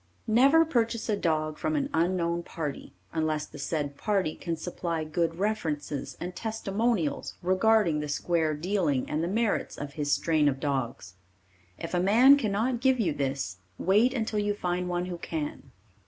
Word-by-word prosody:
Never 275 +9 +5
purchase 230 -6 0
a 210 - +3
dog 155 -5 -1
from 310 - -1
an 285 -2 0
unknown 170 0 +1
party 155 -4 -5 0.2
unless 155 -2 0
the 150 - -12
said 145 -1 -2
party 195 -7 0
can 170 -2 -4
supply 170 -1 -3
good 165 +1 -1
references 160 -9 -2
and 180 +1 -5
testimonials 220 -5 -1
regarding 185 -3 +3
the 150 - -3
square 160 +1 0
dealing 160 -5 0
and 155 +2 -1
the - - 0
merits 220 +3 0
of 140 -1 -6
his 145 -1 -2
strain 155 -2 +3
of 135 -1 -3
dogs. 130 - -3 0.6
If 165 - -6
a 175 - +2
man 230 +9 +7
cannot 230 0 0
give 260 -1 +3
you 175 -9 +1
this, 135 -10 -2 0.2
wait 210 +7 +3
until 220 -4 -1
you 205 0 0
find 180 -2 -2
one 175 0 -1
who 180 -2 -6
can. 150 -5 -5
175 Hz, 165 wpm, -28 LUFS, 155-215 Hz, 0.6 s, man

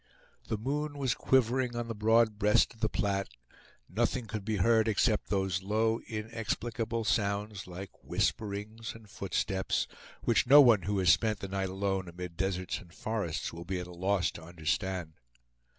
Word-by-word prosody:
The 110 - -1
moon 145 +6 -2
was 130 -4 +1
quivering 125 -1 +2
on 120 0 -3
the 115 - -3
broad 110 0 +3
breast 105 0 +4
of 115 - -21
the 110 -1 +1
Platte; 100 -2 -1 0.6
nothing 120 +4 0
could 110 -1 -5
be 110 +1 -1
heard 110 +3 +3
except 110 0 +2
those 95 -2 0
low 110 +3 +1
inexplicable 115 +1 -3
sounds, 100 0 -1
like 95 +2 -9
whisperings 110 +2 -2
and 110 -2 -13
footsteps, 95 -1 -1 0.4
which 120 +1 +3
no 145 +3 +9
one 120 -8 +7
who 105 - +1
has 90 -2 +5
spent 110 -2 +1
the 100 - -5
night 95 0 -2
alone 95 -1 -1
amid 85 0 -7
deserts 90 0 -2
and 85 - -15
forests 105 -5 -3
will 85 +1 -7
be 90 +1 -3
at 90 - -4
a 90 - -11
loss 95 +1 +1
to - - -10
understand. 85 +1 -2
105 Hz, 165 wpm, -31 LUFS, 95-115 Hz, 0.6 s, no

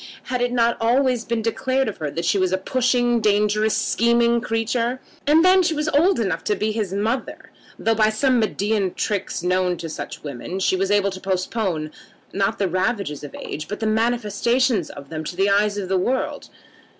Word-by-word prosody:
Had 250 -1 -3
it 245 0 +1
not 235 -1 +2
always 245 0 +2
been 230 -1 -2
declared 260 +4 0
of 215 - -4
her 155 -2 -3
that 165 +4 -4
she 195 - +2
was 185 -1 +1
a 190 - +2
pushing, 245 +2 +1
dangerous, 210 0 +2
scheming 235 0 +2
creature? 230 +3 -1 0.3
And 315 +4 +5
then 375 +1 +6
she 335 -3 +1
was 300 +1 -1
old 330 +5 +3
enough 180 -7 -1
to 210 - +1
be 215 +2 -1
his 210 -4 -2
mother, 220 +6 -3 0.3
though 225 - +1
by 215 -1 +3
some 250 +3 +2
Medean 210 -3 0
tricks 200 -4 -2
known 180 0 +1
to 165 - -6
such - - -7
women, 145 +5 -6
she 190 - +2
was 195 +1 -1
able 205 -1 +2
to 185 0 -8
postpone, 185 -4 -2 0.4
not 195 0 0
the 195 - 0
ravages 185 - -2
of 145 - -8
age, 150 0 -6
but 210 - -5
the 220 - -2
manifestation 230 0 +1
of 140 -1 -10
them 160 -1 -5
to 175 - -6
the 195 +2 +2
eyes 205 +1 +2
of 195 -2 -3
the 190 0 +1
world. 255 +8 -2
215 Hz, 200 wpm, -22 LUFS, 190-240 Hz, 0.4 s, then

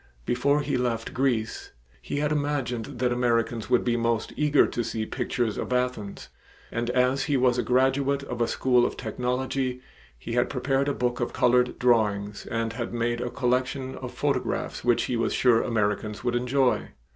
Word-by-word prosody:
Before 140 +4 +2
he 145 -2 -1
left 120 -2 -2
Greece 120 -4 -1 0.3
he - - -5
had 150 +1 0
imagined 145 -6 -1
that 125 0 +1
Americans 120 -2 0
would 125 -1 +3
be 120 -1 +1
most 115 -1 0
eager 150 -1 +4
to 120 - -2
see 110 -1 -3
pictures 120 -2 -2
of - - -4
Athens, 125 -5 -2 0.4
and 120 0 -2
as 125 +2 +2
he 145 -3 +1
was 125 -1 +3
a - - +3
graduate 135 +3 +2
of 125 -3 -5
a 115 - +3
school 125 -2 +2
of - - -1
technology, 125 +1 -2 0.4
he 65 - -8
had 120 0 +2
prepared 135 +1 0
a 145 - -1
book 125 0 -1
of 120 - -2
colored 125 0 +3
drawings 105 -4 +1
and 115 0 -2
had 120 +1 -4
made 120 0 -1
a 125 - -2
collection 130 +1 -1
of - - -7
photographs - - -2
which 120 -1 +3
he 125 - -2
was 115 - 0
sure 120 -3 +4
Americans 105 -1 -1
would 120 -1 0
enjoy. 125 +1 +1
125 Hz, 180 wpm, -26 LUFS, 115-130 Hz, 0.4 s, eager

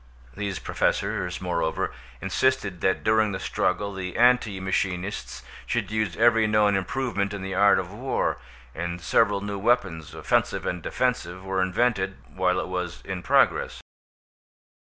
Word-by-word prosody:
These 100 -3 -3
Professors, 90 -1 -1
moreover, 85 -3 -1 0.3
insisted 95 -3 0
that 95 - +1
during 110 -1 +3
the 95 - -3
struggle 100 +2 -1
the 90 -1 -5
anti 120 -5 +4
machinists 95 -8 -2 0.2
should - - -1
use 110 -5 -1
every 115 -1 +4
known 105 -1 +3
improvement 100 -1 -1
in 100 - -6
the 95 0 -4
art 100 +1 +5
of 95 0 -3
war, 130 +5 -1 0.3
and 85 +1 -4
several 100 +3 +2
new 100 0 -4
weapons, 95 - 0
offensive - - 0
and 90 -1 -2
defensive, 95 -6 -1
were 95 0 0
invented, 95 0 +1 0.2
while 90 -1 +1
it - - -3
was 90 -2 -4
in 95 -2 -4
progress. - - +2
95 Hz, 140 wpm, -25 LUFS, 90-105 Hz, 0.3 s, art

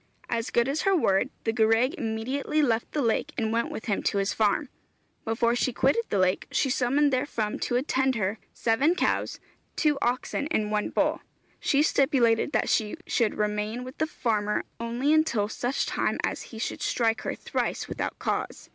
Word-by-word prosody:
As 230 0 -1
good 235 +1 +2
as 285 +3 0
her 390 0 +3
word, 215 - +2
the 225 - 0
gwraig 225 +4 +3
immediately 260 +2 -2
left 230 -4 0
the 295 - 0
lake 240 +6 0
and 220 -1 0
went 235 0 0
with - - -6
him 210 -5 0
to - - 0
his 195 0 0
farm. 220 +7 +1 0.6
Before 235 +1 +1
she 255 - +1
quitted 275 - +2
the - - 0
lake 185 0 +1
she 270 - +1
summoned 275 +4 +2
therefrom 235 -5 -1
to 245 - -1
attend 265 0 +1
her, 210 0 -1
seven 270 +9 +2
cows, - - 0 0.4
two 300 -3 +2
oxen, 255 +4 -1
and 215 -9 0
one 210 -1 0
bull. - - +1 0.4
She 285 +1 +2
stipulated 265 -4 +3
that 220 - +1
she 215 +6 0
should 230 -4 +1
remain 210 +3 -1
with 255 +2 -10
the 315 - +1
farmer 215 -7 -1 0.2
only 240 +6 0
until 310 -10 +2
such 245 +4 -1
time - - -1
as - - -1
he 225 - -9
should 225 - -4
strike 225 -2 +1
her - - -3
thrice - - -2
without - - -4
cause. - - -3
235 Hz, 180 wpm, -27 LUFS, 220-275 Hz, 0.6 s, her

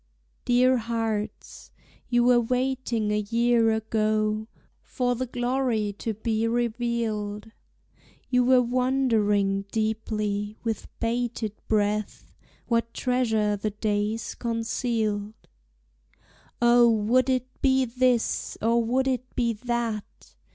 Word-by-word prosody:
Dear 250 +1 +4
hearts, 225 -2 -4 0.4
you 240 -1 +3
were 245 0 +5
waiting 250 -3 -1
a 210 - +1
year 230 +2 +2
ago 215 -1 0 0.3
For 250 -2 -1
the 255 +2 -3
glory 245 -4 -1
to 225 -2 -3
be 220 +1 -1
revealed; 230 -3 -2 0.8
You 250 -1 +3
were 250 0 +5
wondering 225 -6 +1
deeply, 215 -1 -2
with 225 -2 -3
bated 230 -1 -1 0.2
breath, 210 0 -1 0.3
What 230 -1 -1
treasure 220 -5 +1
the 205 +1 -2
days 210 +1 -2
concealed. 225 -2 -2 1.2
O, 240 0 +6
would 230 +4 +2
it 255 0 -2
be 265 -1 +3
this, 250 -1 0
or 230 +1 +2
would 260 +4 +1
it 255 -1 -2
be 235 -2 +1
that? 230 -2 -4
230 Hz, 105 wpm, -26 LUFS, 215-245 Hz, 1.2 s, O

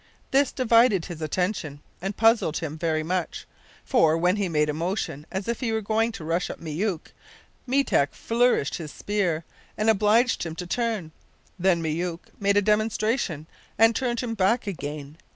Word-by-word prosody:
This 275 0 +3
divided 230 -7 +3
his 170 -4 -8
attention, 160 -2 -2 0.2
and 195 +2 -4
puzzled 225 -8 +3
him 155 -2 -4
very 160 -1 -1
much; 180 +1 -3 0.4
for, 160 0 +3
when 180 +4 +2
he 200 -3 -1
made 150 -2 +2
a 150 - -1
motion 160 -2 -3
as 190 +2 -4
if 235 -1 -2
he 240 -4 -1
were 220 - +1
going 220 +2 0
to 165 - -8
rush 165 +3 -1
at - - -7
Myouk, 170 +2 -3 0.6
Meetek 255 - +2
flourished 235 - +1
his 155 -4 -7
spear, 180 -6 -1 0.3
and 215 +1 +4
obliged 220 +4 +3
him 165 -2 -5
to 180 - -5
turn 220 -5 -2 0.5
then 175 -2 +2
Myouk 165 +2 -3
made 200 0 +2
a 205 - +4
demonstration, 215 - 0 0.3
and 225 +2 +5
turned 240 -3 -1
him 240 -2 -3
back 225 +4 +1
again. 150 -5 -6
190 Hz, 170 wpm, -25 LUFS, 160-225 Hz, 0.6 s, and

